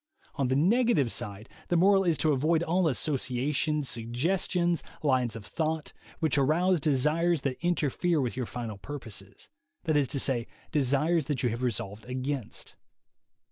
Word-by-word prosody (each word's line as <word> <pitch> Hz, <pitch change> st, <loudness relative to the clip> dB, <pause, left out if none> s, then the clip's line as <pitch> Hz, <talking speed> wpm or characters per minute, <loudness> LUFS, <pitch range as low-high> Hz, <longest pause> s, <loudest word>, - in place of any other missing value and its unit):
On 135 Hz, -, 0 dB
the 130 Hz, -, +1 dB
negative 180 Hz, -, +3 dB
side, 105 Hz, +2 st, -5 dB, 0.2 s
the 175 Hz, -, +2 dB
moral 195 Hz, +2 st, +5 dB
is 170 Hz, -4 st, +2 dB
to 155 Hz, -, +2 dB
avoid 155 Hz, +4 st, +2 dB
all 175 Hz, +1 st, +2 dB
associations, 140 Hz, +1 st, 0 dB
suggestions, 170 Hz, +9 st, 0 dB, 0.2 s
lines 130 Hz, -5 st, +2 dB
of 110 Hz, -3 st, -8 dB
thought, 160 Hz, -1 st, -2 dB, 0.2 s
which 155 Hz, -3 st, +1 dB
arouse 170 Hz, +6 st, +3 dB
desires 150 Hz, +3 st, +2 dB
that 135 Hz, +3 st, -3 dB
interfere 175 Hz, 0 st, +1 dB
with 125 Hz, -3 st, -1 dB
your 125 Hz, -2 st, -3 dB
final 115 Hz, -4 st, -5 dB
purposes, 105 Hz, -5 st, -7 dB, 0.4 s
that 155 Hz, -3 st, +1 dB
is 145 Hz, -2 st, +3 dB
to 140 Hz, -, -2 dB
say, 125 Hz, -4 st, 0 dB, 0.2 s
desires 150 Hz, +3 st, +2 dB
that 140 Hz, -4 st, -1 dB
you 125 Hz, -, +3 dB
have 115 Hz, +2 st, -4 dB
resolved 105 Hz, -3 st, -3 dB
against. 130 Hz, -1 st, -4 dB
145 Hz, 150 wpm, -29 LUFS, 125-165 Hz, 0.4 s, moral